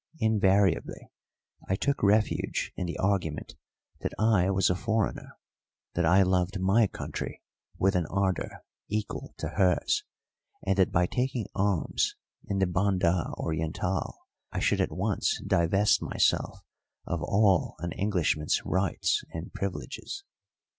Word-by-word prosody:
Invariably 100 - +2 0.6
I 95 - +2
took 140 +8 0
refuge 105 +2 +1
in 90 - -3
the 85 - -4
argument 95 -6 -1 0.5
that - - -3
I 105 -4 +3
was 95 -1 +3
a - - +1
foreigner, 110 +2 -2 0.6
that 85 -1 +1
I 95 +3 +6
loved 95 +1 +1
my 100 +4 +4
country - - -6 0.3
with 95 +1 +2
an 85 -3 +1
ardour 95 0 -2 0.2
equal 105 0 -4
to - - -3
hers, 90 -2 +2 0.6
and 95 0 +2
that 95 - +4
by 85 +1 +3
taking 125 +2 -1
arms 100 -4 0 0.3
in 100 - -2
the 95 - +3
Banda 90 -2 +1
Orientál 80 +4 -2 0.4
I - - -2
should - - +2
at - - 0
once - - 0
divest 95 +4 +3
myself - - +1 0.4
of 85 -1 -2
all 100 0 +2
an 85 +2 -4
Englishman's 85 -7 +1
rights 95 -2 +1
and 80 +2 -7
privileges. 115 - -5
95 Hz, 130 wpm, -28 LUFS, 90-100 Hz, 0.6 s, I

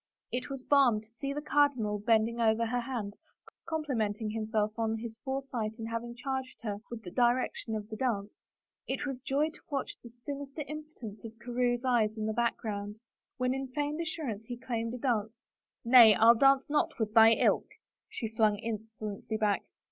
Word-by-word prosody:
It 250 +2 -3
was 270 -2 -6
balm 265 -7 +4
to 220 +1 -19
see 275 -1 -2
the 295 +1 -4
cardinal 255 -9 +2
bending 225 +2 +2
over 225 0 +3
her 245 +2 0
hand, 235 -5 -4 0.6
complimenting 225 -9 -1
himself 215 -1 0
on 225 0 0
his 225 0 -7
foresight 265 -5 -3
in 225 - -5
having 230 +1 -4
charged 265 +1 -4
her 205 -3 -2
with 235 -2 -7
the 180 - -8
direction 240 -1 +1
of 210 -1 -4
the 220 - -6
dance, 210 -4 -1 0.6
it - - -2
was 270 -3 -4
joy 285 +4 0
to - - -15
watch 275 -2 -2
the 235 - -11
sinister 275 +5 -6
impotence 300 -9 -8
of 225 0 -9
Carewe's 245 +1 -1
eyes 225 -4 +2
in 215 - -2
the 220 - -1
background. 215 -3 -2 0.4
When 255 0 +1
in 270 0 -3
feigned 295 +4 -2
assurance 285 -10 -4
he 245 +1 -6
claimed 235 -2 -3
a - - -5
dance; 230 -3 -1 0.3
" - - -49
Nay, 230 -3 +9
I 230 +1 +7
dance 270 +3 +4
not 295 0 0
with 215 -2 -2
thy 225 0 +8
ilk," - - +2 0.4
she 225 - -4
flung 215 -1 +2
insolently 220 -1 -5
back. 210 -2 +1
235 Hz, 180 wpm, -31 LUFS, 220-265 Hz, 0.6 s, Nay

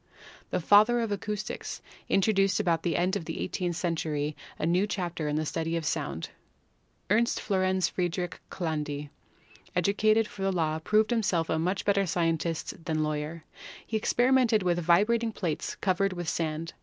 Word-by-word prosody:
The - - 0
"father 210 +7 +5
of 225 -2 -1
acoustics" 210 +1 -4 0.3
introduced 195 -1 +3
about 170 -5 +1
the 170 - -1
end 185 +3 +1
of 175 - -3
the - - -5
eighteenth 175 -3 -2
century 155 -4 -1 0.2
a - - -2
new 180 +5 +2
chapter 175 -6 -3
in 150 - -1
the 155 +1 0
study 165 +2 -1
of 165 - -4
sound. 145 - -2 0.8
Ernst 235 +3 +3
Florens 185 -3 +1
Friedrich 175 0 -2
Chladni, 150 -4 -3 0.6
educated 210 +4 +3
for 200 - -10
the 195 0 +1
law, 160 -3 0
proved 215 +6 +2
himself 185 -8 +1
a 160 - +1
much 185 +4 -1
better 200 -1 +2
scientist 165 -1 -1
than 155 -1 0
law 155 0 0
yer. 150 +2 -5 0.4
He 225 - -4
experimented 245 -1 +3
with 175 -1 +1
vibrating 210 +7 +3
plates 170 -8 -3
covered 195 0 +1
with 175 -2 -5
sand. 160 0 -2
180 Hz, 160 wpm, -28 LUFS, 160-205 Hz, 0.8 s, father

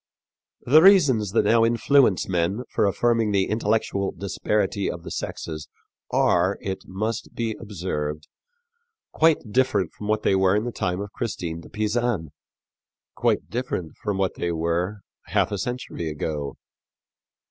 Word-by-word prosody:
The 150 +5 +7
reasons 145 - +5
that - - +3
now 115 0 +4
influence 120 -2 +3
men 95 +6 0
for - - +2
affirming 115 +2 +2
the 100 -1 +3
intellectual 105 -2 0
disparity 100 0 -1
of 85 - -6
the - - -8
sexes 75 -3 -5 0.4
are, 90 +3 +2
it 95 -1 -5
must 110 +4 -4
be 115 -2 -2
observed, 75 -8 -4 0.8
quite 155 -9 +2
different 105 -8 +1
from 105 - -8
what 105 0 0
they - - +3
were 95 0 +3
in 105 - +1
the 120 - -3
time 90 -3 -2
of 100 0 -6
Christine 85 -7 -4
de - - -14
Pisan 110 -6 -1 0.8
quite - - 0
different 115 -9 -3
from 105 -2 -3
what 95 -2 0
they 85 - -2
were 85 +5 -1 0.3
half - - +1
a 100 - -2
century 120 -8 -4
ago. 75 -1 -4
100 Hz, 145 wpm, -24 LUFS, 90-115 Hz, 0.8 s, The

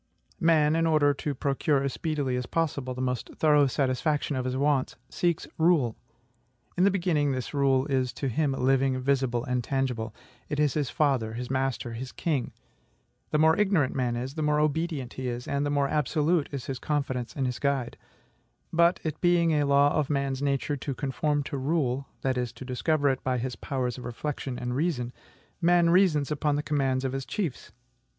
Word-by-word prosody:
Man, 160 -3 +4
in 165 0 +2
order 150 -2 +4
to 140 +1 -4
procure 140 +1 +1
as 140 - -1
speedily 145 -5 -1
as 125 -1 -3
possible 140 -6 -1
the 130 - -3
most 125 -2 -2
thorough 150 -2 +4
satisfaction 140 +3 0
of 130 -1 -2
his 130 0 -1
wants, 140 -1 +1
seeks 170 -2 0
RULE. 160 -9 +3 0.8
In 180 - +3
the - - +6
beginning, 170 -7 +1
this 130 +2 -4
rule 135 -2 +2
is 130 -3 0
to 140 - -3
him 140 +3 0
living, 135 0 +2
visible, 130 -2 0
and 125 -2 -1
tangible. 125 -4 -1 0.4
It 150 -1 -2
is 150 -3 +2
his 145 -5 -1
father, 130 -7 +1
his 125 +2 -5
master, 130 -3 -1
his 125 +3 -6
king. 145 -7 -2 0.8
The - - +1
more 160 +1 +5
ignorant 190 -10 +2
man 125 -2 0
is, 125 +3 -4
the 155 - -4
more 150 0 +2
obedient 150 -3 -1
he 130 -1 -4
is, 120 0 -4
and 140 +1 0
the - - -1
more 145 -1 +1
absolute 150 +2 +1
is 135 -4 -5
his 130 -2 -4
confidence 130 -5 -2
in 135 - -1
his 125 -1 -2
guide. 140 -4 -1 0.8
But, 170 +1 +4
it 155 -1 -4
being 175 -2 +3
a 145 -2 +2
law 140 +1 +4
of 150 -3 0
man's 140 -2 -1
nature 145 +1 0
to 135 0 -4
conform 145 +2 -1
to 140 0 -4
rule, 135 -2 0
that 130 -1 0
is, 125 -2 -2
to 130 - -10
discover 145 +3 +1
it 130 -1 -1
by 130 -1 0
his 125 +1 -3
powers 130 -2 -3
of - - -9
reflection 130 +1 -4
and 125 0 -3
reason, 130 -5 -1 0.5
man 170 0 +4
reasons 165 -6 +3
upon 150 0 +1
the 145 - -1
commands 135 -3 0
of 130 - -2
his 135 0 -3
chiefs. 180 - -4
140 Hz, 190 wpm, -27 LUFS, 130-150 Hz, 0.8 s, the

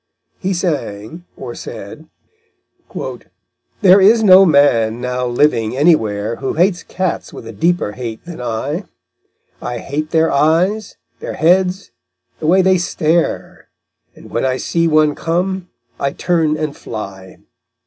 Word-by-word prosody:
He 190 0 -1
sang 160 - -4
or - - -7
said: - - -9 0.9
_There 195 -1 0
is 220 +3 +5
no 190 -1 +8
man 120 -7 +3
now 125 0 -2
living 120 -2 +1
anywhere 115 -8 +2
Who 135 - -3
hates 175 +2 +2
cats 185 -2 -3
with - - -10
a 115 - -7
deeper 170 - 0
hate 115 +2 -7
than 170 -6 -8
I; 130 - -3 0.8
I 120 0 -4
hate 150 +5 -4
their 160 0 +2
eyes, 175 +9 +1 0.2
their - - -6
heads, 185 +3 +1 0.5
the 155 - -3
way 185 +3 +4
they 190 -1 +3
stare, 170 -1 -1 0.5
And - - -15
when - - -1
I 130 -1 0
see 165 +4 0
one 155 -1 +3
come, 180 +3 -2 0.3
I 140 0 -1
turn 160 -3 0
and 155 -1 -3
fly_. 95 -6 -8
155 Hz, 135 wpm, -17 LUFS, 125-180 Hz, 0.9 s, no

